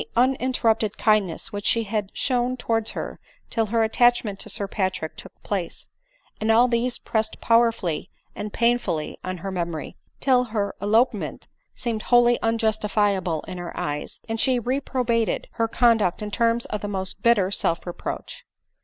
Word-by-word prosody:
91 240 - +6
uninterrupted 225 -4 +1
kindness 215 -2 +1
which 205 0 -4
she 230 - +3
had 210 -2 -2
shown 250 -1 0
towards 225 -2 0
her - - -5 0.3
till 225 -2 +1
her 225 +1 +2
attachment 225 -3 +2
to - - -7
Sir 205 -3 -2
Patrick 190 -5 -2
took - - -10
place 190 -5 -3 0.4
— 220 - -4
all 235 +3 +6
these 240 +1 +1
pressed 220 -1 -2
powerfully 230 -8 +2 0.3
and 210 0 -5
painfully 235 -10 0
on 185 0 -3
her 195 - -2
memory, 170 -4 -4 0.2
till 250 -2 +3
her 210 -3 -2
elopement 220 +2 +1 0.3
seemed 230 -3 -3
wholly 240 0 +4
unjustifiable 210 -6 +1
in 180 -1 -7
her 175 -1 -6
eyes, 145 0 -4
and 225 0 -3
she 255 +1 +3
reprobated 245 -2 0
her 230 -1 0
conduct 225 -5 +2
in 210 - -5
terms 230 +1 +1
of 210 - -4
the 205 - -3
most 190 -1 -3
bitter 205 -4 +3
self 170 -4 0
reproach. 180 - -6
220 Hz, 155 wpm, -24 LUFS, 200-235 Hz, 0.4 s, 91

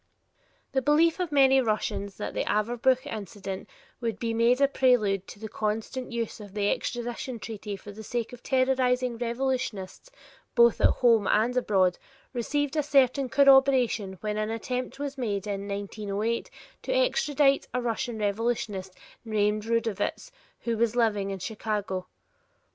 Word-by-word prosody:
The 265 - +1
belief 315 +5 +3
of 355 -3 -2
many 270 -2 +5
Russians 210 -3 -2
that - - -4
the - - -1
Averbuch 245 +5 +1
incident 195 -2 -6 0.3
would 230 -3 -2
be 230 0 -2
made 235 +3 +3
a 280 - +5
prelude 230 -8 +2
to - - -10
the 220 - -6
constant 220 +5 -3
use 230 -2 -3
of 205 -1 -11
the 205 -1 +1
extradition 240 0 -3
treaty 210 -2 -6
for 205 +1 -10
the 210 +2 -10
sake 235 +2 -3
of 245 - -10
terrorizing 255 -2 +1
revolutionists 240 - -3 0.5
both 235 -1 +5
at - - +7
home 230 -5 +3
and 230 +4 +2
abroad 190 -7 +2 0.3
received 290 +4 -1
a 305 - +3
certain 275 -2 +3
corroboration 265 -7 +4
when 210 0 -2
an 215 0 -1
attempt 250 +4 -3
was 280 -1 -5
made 205 -5 -2
in 200 -1 -4
1908 205 +2 -3 0.3
to - - -4
extradite 300 - +2
a 250 - -1
Russian 235 -1 -2
revolutionist 205 -3 -2 0.3
named 215 -1 0
Rudovitz 230 - -1 0.3
who 230 -1 -1
was 235 0 +1
living 210 -4 +1
in 195 - -3
Chicago. 205 -2 -3
230 Hz, 150 wpm, -27 LUFS, 210-260 Hz, 0.5 s, at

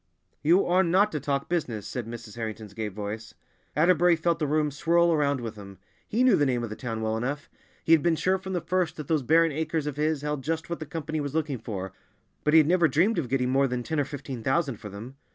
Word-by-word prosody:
"You 170 +6 +4
are 180 +2 +3
not 190 +4 +3
to 150 - -2
talk 140 -1 -2
business," 125 - -2
said 120 -3 -5
Mrs. 115 -2 -8
Harrington's 110 -3 -6
gay 110 +1 -3
voice. 105 +2 -6 0.4
Atterbury 175 +2 +4
felt 165 +1 0
the 150 - 0
room 150 0 +1
swirl 170 +4 +3
around 140 -4 +1
with 115 -2 -6
him; 100 -1 -11 0.3
he 235 +4 +1
knew 255 - +6
the 145 - +2
name 125 -2 0
of 115 - -5
the - - -4
town 115 -2 -4
well 110 0 0
enough! 135 +6 -3 0.3
He - - 0
had 165 -2 +7
been 170 +1 +2
sure 185 +4 +1
from 190 0 -6
the 175 - -1
first 185 -1 0
that 150 -3 -7
those 155 -3 +1
barren 165 +5 +4
acres 160 +1 -2
of 145 -2 -4
his 150 -1 0
held 150 -2 -2
just 160 +3 -3
what 170 - -2
the 155 - -6
Company 155 0 -3
was 145 0 -4
looking 150 -5 -1
for, 95 -4 -5 0.5
but 150 +1 +3
he - - +10
had 155 -2 +6
never 175 -1 +4
dreamed 180 +7 +2
of 130 -7 -3
getting 125 -1 +1
more 135 +1 +3
than 125 -1 -3
ten 160 +4 -2
or 145 - +1
fifteen 135 -3 -7
thousand 135 0 0
for 105 - -9
them. 115 +7 -9
145 Hz, 250 wpm, -27 LUFS, 120-165 Hz, 0.5 s, he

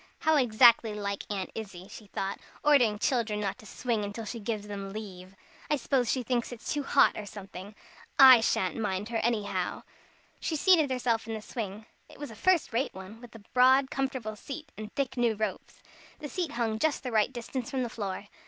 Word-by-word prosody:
"How 315 0 +3
exactly 235 -4 +5
like 200 -1 -3
Aunt 195 -2 -3
Izzie," 195 -4 -8
she 210 - -12
thought, 195 0 -4 0.2
"ordering 275 -7 +5
the - - -7
children 225 -2 0
not 200 -2 -3
to 215 - -13
swing 215 -3 -2
till 225 +2 -6
she 230 +2 -5
gives 210 -1 -4
them 200 -1 -6
leave. 195 -3 -8 0.3
I 300 - +3
suppose 260 -3 0
she 255 0 0
thinks 240 0 -1
it's 240 -2 -5
too 295 - -1
hot, 275 - +4
or 210 - -6
something. 195 0 -9 0.4
I 260 -4 +10
sha'n't 190 -3 0
mind 210 -1 -2
her, 235 - -1
anyhow." 225 -2 -1 0.6
She 320 - -2
seated 315 -2 +4
herself 240 -3 0
in 225 - -3
the 215 - -6
swing. 215 -3 -6 0.2
It - - -14
was 290 -4 -7
a - - -10
first 345 - +2
rate 245 -1 -1
one, 190 +4 -10
with 240 -2 -13
a 220 - -12
broad, 260 +2 +5
comfortable 260 -5 -3
seat, 290 +7 -8
and 215 0 -8
thick 275 -2 -2
new 235 -2 +2
ropes. 210 -2 -5 0.3
The 295 - -7
seat 345 -3 -3
hung 225 -2 -1
just 315 +3 0
the 250 - -4
right 220 +2 +2
distance 245 0 -5
from 260 -2 -1
the - - -2
floor. 200 -3 -5
225 Hz, 205 wpm, -29 LUFS, 210-260 Hz, 0.6 s, I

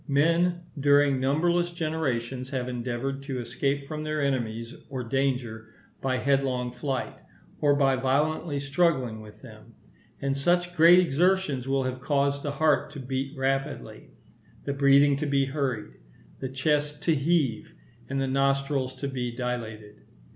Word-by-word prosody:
Men, 170 +5 +2 0.2
during 145 -1 +4
numberless 170 +6 +1
generations, 135 -7 -2
have 130 -3 -3
endeavoured 125 +2 -3
to 135 -2 -5
escape 140 +3 -2
from 155 +1 -5
their 155 0 -2
enemies 120 -4 -2 0.2
or 130 -2 -4
danger 120 -3 -2 0.3
by 130 -1 0
headlong 130 -2 0
flight, 130 +1 -3 0.5
or 145 -1 +3
by 135 -2 +3
violently 145 +3 0
struggling 140 -6 0
with 105 0 -14
them; - - -14 0.4
and 135 0 -1
such 175 +5 +1
great 170 +2 +8
exertions 175 -5 +2
will 135 0 +1
have 130 0 -4
caused 140 0 +1
the 145 -1 -3
heart 145 -2 +2
to 145 - -7
beat 135 +2 -4
rapidly, 135 +1 -3 0.6
the 140 - -1
breathing 140 0 +5
to 150 +1 -2
be 140 -1 +2
hurried, 130 - -3 0.5
the 130 - -4
chest 150 +2 -1
to 165 - +3
heave, 145 -6 0 0.3
and 135 0 -1
the 135 - +1
nostrils 135 0 0
to 140 +2 -4
be 125 -3 -3
dilated. 110 -4 -5
135 Hz, 145 wpm, -27 LUFS, 130-145 Hz, 0.6 s, great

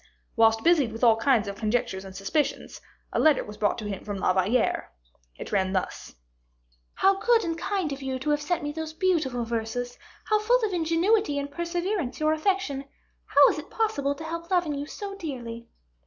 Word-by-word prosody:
Whilst 225 -1 +4
busied 310 -9 +4
with 225 +2 -7
all 230 -2 +7
kinds 230 -2 +2
of 200 - -4
conjectures 215 -3 -1
and 190 -1 -10
suspicions, 195 +10 -2 0.3
a - - +1
letter 310 -3 +4
was 210 0 -10
brought 210 -1 +1
to 220 - -6
him 195 -2 -5
from 205 -1 -4
La 185 - +2
Valliere; 200 +6 +1 0.5
it - - -8
ran 190 -2 +1
thus: 185 - -3 0.8
"How 390 0 +3
good 465 +1 +3
and 330 -2 -2
kind 370 -2 -2
of 275 - -8
you 265 -1 -2
to 265 +4 -1
have 295 0 +1
sent 335 +2 -1
me 295 - -2
those 315 0 -5
beautiful 310 -10 0
verses; 235 +2 -3 0.3
how 430 -1 +2
full 480 +4 +3
of 405 - -3
ingenuity 335 +1 +2
and 285 0 -3
perseverance 345 - -2
your 310 0 +2
affection 315 -4 0
is; 275 - -16 0.4
how - - +6
is - - -2
it - - -10
possible 285 -12 0
to 315 - -8
help 335 +1 -5
loving 350 -5 +1
you 285 +1 -4
so 400 +3 -6
dearly!" 240 -10 -6
285 Hz, 200 wpm, -26 LUFS, 230-345 Hz, 0.8 s, all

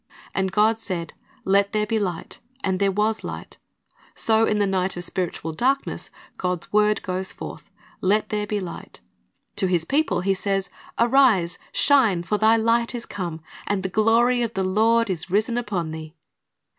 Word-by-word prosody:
And 190 -1 0
God 215 +3 +3
said, 175 -7 -4 0.3
Let 200 +1 +2
there 210 0 +1
be 220 +1 0
light; 180 -5 -4 0.2
and 190 -1 0
there 200 -1 +2
was 210 +3 0
light. - - -7 0.6
"^ - - -27
So 220 0 +3
in 210 - +1
the 205 - +2
night 190 -1 0
of 175 - -4
spiritual 170 -3 -3
darkness, 270 - -1 0.3
God's 180 -1 -3
word 210 0 +3
goes 185 0 -3
forth, - - -9 0.3
"Let 205 +3 +2
there 210 -1 -2
be 210 0 -1
light." 180 -3 -8 0.6
To 190 - +3
His 175 -3 +1
people 300 - +1
He 195 +1 +2
says, 195 0 -1 0.3
"Arise, 235 -8 +3
shine; 230 -12 +3
for 210 +4 -1
thy 220 +1 +5
light 230 +2 +1
is 235 - -5
come, 170 -5 -5 0.3
and 200 -2 -1
the 190 - -2
glory 230 +5 +3
of 230 -1 -2
the 190 - 0
Lord 225 +5 +3
is 175 0 -4
risen 215 +5 +1
upon 195 -9 -2
thee." 160 0 -8
200 Hz, 175 wpm, -23 LUFS, 185-225 Hz, 0.6 s, thy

